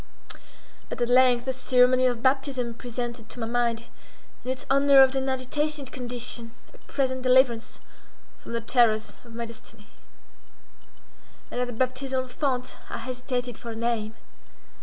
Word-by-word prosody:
But - - -5
at 240 0 +1
length 250 -1 +5
the 260 - -1
ceremony 255 0 +4
of 240 -2 -1
baptism 260 -2 +1
presented 240 -1 -5
to - - -10
my 225 - -1
mind, 235 0 0 0.6
in 250 - -5
its 260 0 -3
unnerved 275 -1 +6
and 265 0 0
agitated 275 +2 -2
condition, 240 -2 -5 0.2
a - - -17
present 260 -2 0
deliverance 255 -2 +3 0.6
from - - -8
the 230 - -1
terrors 225 -2 +3
of 235 -2 -13
my 235 0 -3
destiny. 230 -1 -13 1.7
And 245 - -2
at 250 - 0
the 245 - -5
baptismal 260 +1 -1
font 255 -2 -2
I - - -4
hesitated 250 -2 -4
for 235 - -8
a 225 - -5
name. 225 -1 -1
250 Hz, 145 wpm, -26 LUFS, 235-260 Hz, 1.7 s, unnerved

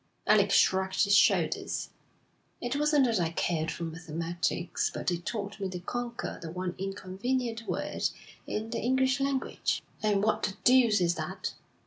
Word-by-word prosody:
Alec - - +5
shrugged 190 +1 +3
his 200 -1 +3
shoulders. 210 - +2 0.7
'It 245 +2 -2
wasn't 295 -1 +4
that 230 -5 +1
I 170 -2 +1
cared 165 -1 -1
for 170 - -4
mathematics, 165 +1 -2
but - - -2
it 175 0 -4
taught 205 -2 -4
me 195 -1 -2
to 180 -1 -5
conquer 240 +6 -4
the 165 - -6
one 180 +1 -3
inconvenient 225 +5 -3
word - - -1 0.4
in 220 +1 -3
the 235 - -1
English 260 +2 +2
language.' 275 -1 -1 0.2
'And 205 -2 +2
what 220 - +2
the 195 - -1
deuce 245 -5 +5
is 175 -1 +3
that?' - - -4
200 Hz, 155 wpm, -29 LUFS, 175-245 Hz, 0.7 s, Alec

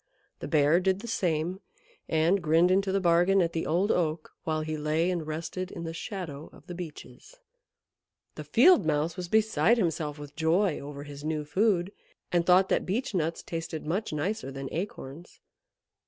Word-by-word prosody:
The - - -5
Bear 150 +2 +4
did 190 +1 0
the 235 - -8
same, 180 -4 -1 0.5
and 165 +5 +2
grinned 165 +2 +4
into 195 +1 +2
the 195 - +2
bargain 175 +2 +4
at 170 -2 +1
the 165 - -2
Old 180 +7 +2
Oak 160 -2 -1
while 155 -1 0
he 155 0 -3
lay 155 +4 0
and 170 -4 -3
rested 165 +4 -4
in 170 - -7
the 165 0 -5
shadow 165 - -6
of - - -17
the 180 - -7
Beeches. 175 - -10 1.0
The - - -7
Field 365 - +5
Mouse 155 +1 0
was 180 -1 -5
beside 220 0 +3
himself 160 -6 -1
with 145 0 -10
joy 170 +5 +2
over 140 0 -8
his 145 -1 -10
new 155 -1 -2
food, 185 +2 +1 0.4
and 175 -1 +1
thought 185 +1 +6
that - - +2
Beech 220 +6 -1
nuts 165 -2 -1
tasted 165 -1 -5
much 190 +8 -2
nicer 170 +4 -2
than 135 0 -6
acorns. 170 -3 -6
170 Hz, 175 wpm, -28 LUFS, 155-185 Hz, 1.0 s, thought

